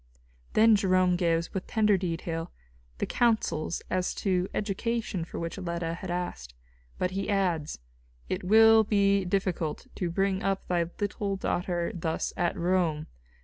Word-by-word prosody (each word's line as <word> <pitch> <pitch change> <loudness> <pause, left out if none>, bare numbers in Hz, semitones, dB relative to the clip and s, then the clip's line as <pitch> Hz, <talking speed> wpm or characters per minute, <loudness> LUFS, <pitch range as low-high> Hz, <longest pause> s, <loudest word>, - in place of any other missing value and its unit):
Then 220 0 +6
Jerome 185 -3 +3
gives, 170 -1 0
with 190 - -4
tender 210 -2 +3
detail, 165 -2 -3 0.5
the - - -1
counsels 220 -9 0
as 185 -1 -1
to 185 -2 0
education 210 -2 -2
for - - -8
which 170 +3 -4
Leta 170 -2 -3
had 180 +2 -7
asked. 175 - -4 0.4
But 180 - -1
he 195 +1 -3
adds: 180 -7 0 0.5
"It - - -3
will 220 +3 +7
be 200 -2 +2
difficult 180 -4 -1
to 180 - -2
bring 195 +2 0
up 195 0 -1
thy 175 -2 +1
little 205 -1 -2
daughter 175 -2 -1
thus 165 -2 -2
at 175 - 0
Rome. 170 -3 +1
185 Hz, 145 wpm, -28 LUFS, 170-200 Hz, 0.5 s, will